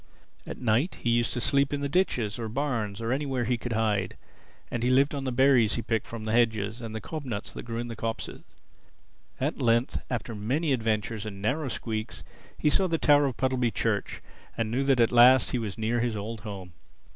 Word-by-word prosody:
At - - -6
night 125 - +1
he 120 - +2
used 120 0 +2
to 125 - -2
sleep 140 +4 +2
in 145 -1 -2
ditches 125 - 0
or 115 -1 -3
barns 115 -5 -2
or 115 +1 -1
anywhere 135 -3 -1
he 120 +2 +1
could 120 0 -4
hide; 105 -3 0 0.5
and 120 - -2
he 125 - +1
lived 135 +3 +4
on 140 -1 -3
the 130 - -1
berries 125 -4 +4
he 115 - -3
picked 115 -1 -1
from 115 -2 -7
the 110 - -3
hedges 110 -1 +1
and 110 -1 -6
the - - -2
cob 155 +6 -6
nuts 110 -6 -4
that - - -7
grew 115 -1 -4
in 120 +1 -3
the 115 - -6
copses. 115 +1 -4 1.0
At 140 +2 -2
length, 120 0 +2
after 115 -2 -3
many 135 +9 0
adventures 110 -2 -1
and 100 -2 -7
narrow 135 +9 -1
squeaks, 110 -2 -4 0.3
he 150 - +2
saw 190 +5 +3
the 165 -2 0
tower 145 -2 +4
of 130 - -4
Puddleby 130 -2 +1
Church - - -1 0.3
and 115 -1 -1
he - - -5
knew - - +2
that 135 -2 +3
at 115 - +4
last 125 +2 +6
he 125 - 0
was 105 -3 -4
near 115 +2 0
his 120 -1 0
old 105 +2 -5
home. 95 -5 -8
120 Hz, 215 wpm, -27 LUFS, 110-130 Hz, 1.0 s, last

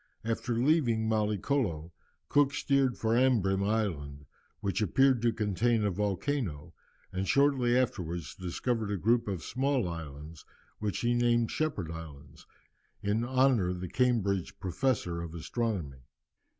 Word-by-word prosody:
After 115 +1 -1
leaving 120 -4 +2
Mallicolo, 105 - 0 0.4
Cook 145 -1 +3
steered 135 -3 +1
for 110 0 0
Ambrym 105 -7 +3
Island, 80 -10 -2 0.3
which 100 +2 -1
appeared 130 +5 +3
to 120 0 +3
contain 110 +1 +1
a 100 - +1
volcano, 95 - -2 0.4
and 95 +1 -2
shortly 130 -2 +3
afterwards 90 -10 -2
discovered 110 +5 -2
a 100 - -1
group 115 +6 +2
of 95 -5 -3
small 135 -4 0
islands, 80 -2 -8 0.4
which 105 -2 -2
he 120 0 +2
named 120 -1 +2
Shepherd 125 - -2
Islands, 75 -4 -10 0.6
in 105 +3 +1
honour 130 -6 +3
of 90 0 -3
the 90 - -4
Cambridge 100 -5 0
Professor 95 -3 -1
of 85 0 -7
Astronomy. 85 - -3
105 Hz, 130 wpm, -30 LUFS, 90-125 Hz, 0.6 s, Cook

